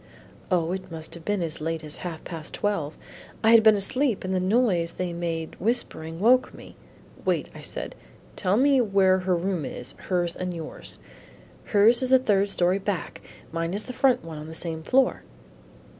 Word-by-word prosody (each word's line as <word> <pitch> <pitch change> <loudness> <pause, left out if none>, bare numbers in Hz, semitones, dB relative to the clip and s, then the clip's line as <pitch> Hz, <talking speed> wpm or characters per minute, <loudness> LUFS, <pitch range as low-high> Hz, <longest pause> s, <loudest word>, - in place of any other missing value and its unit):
"O, 175 -3 +1
it 190 0 -5
must 160 -1 -5
have 170 - -4
been 205 -1 0
as 160 -2 -4
late 165 0 -2
as 150 -1 -7
half 170 -3 -6
past 160 -3 -7
twelve. 165 -8 -2 0.5
I 220 - +6
had 230 -1 +8
been 220 -1 +6
asleep 240 +4 +1
and 185 0 -2
the 185 - +1
noise 185 -4 +2
they 180 -1 -3
made 165 -2 -3
whispering, 170 -7 -2
woke 250 +5 +4
me." - - -13 0.5
"Wait," - - 0
I - - -10
said, - - -5 0.4
"tell 190 +1 +1
me 270 0 +4
where 195 -4 +3
her 185 0 +1
room 175 -1 -1
is, 125 - -5 0.2
hers 175 -2 0
and 180 -1 -4
yours." 160 -2 -4 0.7
"Hers 220 +4 +5
is 255 - +2
the 260 - +7
third 205 -5 +2
story 185 0 +2
back, 195 -2 -4 0.3
mine 165 0 -2
the 215 +5 -5
front 260 -5 +3
one 160 -2 -7
on 150 - -8
the 160 - -8
same 160 -1 -3
floor." 255 +9 +2
185 Hz, 185 wpm, -26 LUFS, 165-215 Hz, 0.7 s, had